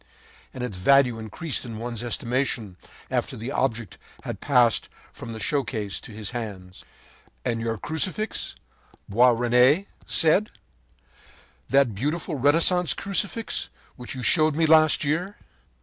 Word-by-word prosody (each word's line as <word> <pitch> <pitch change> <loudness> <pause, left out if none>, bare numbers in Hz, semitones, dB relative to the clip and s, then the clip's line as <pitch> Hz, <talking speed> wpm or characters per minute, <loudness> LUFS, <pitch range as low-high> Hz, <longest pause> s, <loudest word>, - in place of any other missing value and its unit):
And 125 - -7
its 105 -7 -5
value 125 +2 +4
increased 135 +8 -3
in 115 -3 -7
one's 115 0 -5
estimation, 120 -4 -2 0.4
after - - -2
the 115 +5 -5
object 115 -8 -2 0.2
had - - -6
passed 125 -5 +2 0.2
from 115 - -9
the 110 - -7
showcase 115 -6 -2
into - - -12
his 105 0 -6
hands. 100 -6 -7 0.6
“And 115 -1 -1
your 115 -1 -2
Crucifix,” 185 - -1 0.5
said - - -13
Boisrene, 125 - +4 1.8
“that 135 -4 +3
beautiful 150 - -3
Renaissance 165 +6 +3
Crucifix 200 +3 -2 0.3
which 125 +1 -7
you 130 - -6
showed 155 +4 +3
me 165 +1 +2
last 155 -1 +5
year? 170 +7 -1
125 Hz, 125 wpm, -25 LUFS, 115-155 Hz, 1.8 s, last